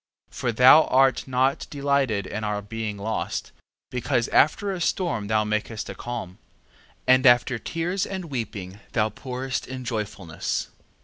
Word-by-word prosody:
3:22. - - -17
For 120 - -1
thou 130 +7 +8
art 135 +1 +3
not 130 +1 +1
delighted 140 -8 0
in 105 +3 -5
our 105 -1 -2
being 110 0 -4
lost, 110 +2 -3 0.4
because 120 -1 0
after 195 +7 +3
a 185 -2 -4
storm 165 - -1
thou 110 0 +2
makest 110 +1 -3
a - - -6
calm, 95 -7 -6 0.7
and 130 +1 +5
after 120 0 +4
tears 175 - -2
and 190 -2 -5
weeping 105 - -5
thou 110 -2 +2
pourest 130 +3 -4
in 130 -1 -6
joyfulness. 105 -7 -3
120 Hz, 145 wpm, -25 LUFS, 105-135 Hz, 0.7 s, thou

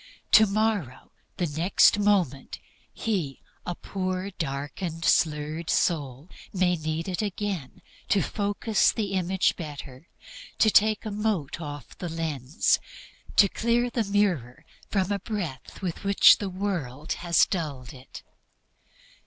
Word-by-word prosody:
Tomorrow, 215 - +2 0.3
the 180 - 0
next 170 +6 +3
moment, 185 -10 +1 0.3
he, 180 -12 -2 0.3
a 175 - -2
poor, 185 +1 -4
darkened, 160 +1 -4 0.2
blurred 155 +1 -6
soul, 145 -3 0 0.2
may 180 -2 +2
need 155 +1 -3
it 185 0 -2
again 200 -8 -4 0.3
to 195 -4 +3
focus 205 +3 +1
the 210 -4 -3
Image 190 0 +1
better, 145 -2 -9 0.5
to 220 - +4
take 215 +1 +3
a 215 - -3
mote 205 -8 -2
off 145 -4 -8
the 175 - -4
lens, 155 -4 0 0.6
to 200 - +7
clear 235 +4 0
the 235 -1 0
mirror 170 - 0 0.2
from 195 -1 0
a 200 - 0
breath 190 - -6
with 175 +1 -4
which 200 0 +6
the 200 - -3
world 175 -8 -3
has 170 -1 +4
dulled 145 -9 -4
it. 130 0 -12
180 Hz, 125 wpm, -26 LUFS, 150-205 Hz, 0.6 s, to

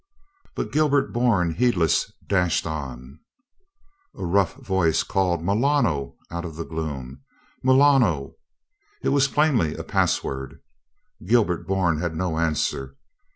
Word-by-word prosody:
But - - -3
Gilbert 145 -2 +2
Bourne, 110 -9 +2
heedless, 95 -8 +1 0.2
dashed 90 -4 +1
on. 70 -3 -6 1.0
A 95 - -5
rough 95 +1 +1
voice 95 -5 +1
cried 90 -4 0
"Milano?" 105 - +1 0.2
out 85 0 -4
of 80 -3 -7
the 85 +1 -5
gloom. 70 -5 -6 0.4
"Milano?" 130 - +3 0.7
It - - +1
was 140 -1 +3
plainly 140 - +1
a - - -6
password. 65 -1 -1 0.7
Gilbert 105 -6 +2
Bourne 95 -5 +1
had 85 -2 -2
no 85 -1 -2
answer. 70 -4 -1
85 Hz, 115 wpm, -24 LUFS, 80-120 Hz, 1.0 s, Milano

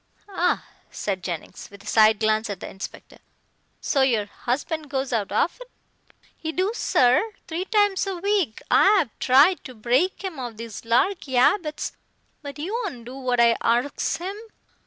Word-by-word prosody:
"Ah!" 360 -2 0 0.2
said 195 -3 -3
Jennings, 175 -4 -6
with 200 0 -14
a - - -18
side 215 -1 +4
glance 220 0 +1
at 200 -3 -4
the - - -7
inspector, 190 - -9 0.6
"so 275 - +1
your 235 -6 +2
husband 285 +8 -3
goes 265 -2 -2
out 210 -4 -1
often?" - - -1 0.7
"He 320 - -4
do, 370 +5 0
sir. 415 - +2
Three 340 +3 -3
times 410 -2 +2
a 385 -2 -3
week. 385 - 0
I 405 +1 +6
'ave 255 - -5
tried 280 +8 +5
to 255 - -9
break 250 - +1
'im 365 -7 -5
of 240 -4 -6
these 230 -1 -8
larky 260 +3 +1
'abits 305 +3 +2 0.5
but 285 -2 -8
he 320 +7 -4
won't 400 - -4
do 250 +2 -8
what 255 -2 -1
I 235 -1 +5
arsks 245 +5 0
him. 370 +4 -5
270 Hz, 165 wpm, -24 LUFS, 230-365 Hz, 0.7 s, I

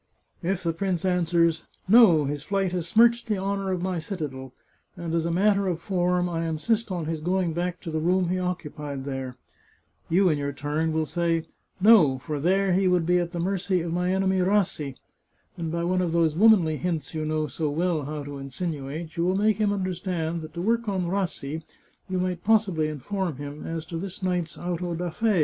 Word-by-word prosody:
If 185 +1 -1
the 165 -1 0
prince 185 0 -1
answers, 170 -2 +2 0.2
* - - -38
No; 165 -10 +6
his 145 +1 -3
flight 195 +2 -1
has 175 -2 -3
smirched 235 +5 +4
the 210 -2 0
honour 195 0 -2
of 180 -1 -2
my 185 -2 -1
citadel, 145 -7 -5 0.5
and 170 -1 -4
as 165 0 +1
a - - -1
matter 200 +2 +3
of 175 -3 -1
form, 180 -1 +1
I 165 -1 -2
insist 210 +8 0
on 175 -3 -2
his 160 -1 -3
going 180 0 0
back 175 +1 -2
to 165 - -6
the 160 - -1
room 180 +2 +2
he 185 +1 0
occupied 150 -6 -4
there,* 135 -2 -4 0.7
you 185 +3 +4
in 150 -3 +1
your 140 0 -2
turn 150 +3 -1
will 160 0 0
say, 165 +1 0 0.2
* - - -43
No; 150 -12 +5
for 150 +3 -4
there 190 +4 +2
he 190 +1 +3
would 180 -2 +2
be 180 +1 +3
at 170 -1 -2
the 175 - -4
mercy 185 0 0
of 165 0 -3
my 180 +1 0
enemy 190 0 +1
Rassi,' 180 -7 +1 0.6
and 165 -2 -4
by 170 0 -1
one 185 +1 +1
of 170 -2 -1
those 165 -2 +2
womanly 185 -6 +5
hints 165 -5 -3
you 155 -1 -2
know 155 0 0
so 150 +2 -2
well 160 0 0
how 150 0 -4
to 140 0 -7
insinuate, 150 +2 -5
you 170 - +1
will 185 +1 +2
make 210 0 +2
him 210 -2 +2
understand 180 -4 -2
that 155 +1 -10
to 170 - -3
work 230 +1 +1
on 190 -3 -1
Rassi, 170 -5 -2 0.5
you 185 - -1
might 180 -1 -2
possibly 200 -8 +2
inform 170 +3 -3
him 145 +2 -7
as 165 -1 -4
to 165 0 -5
this 195 +1 -6
night's 180 -3 -1
auto 175 0 -3
da 175 0 -3
fe. 215 +1 +1
175 Hz, 210 wpm, -26 LUFS, 155-185 Hz, 0.7 s, No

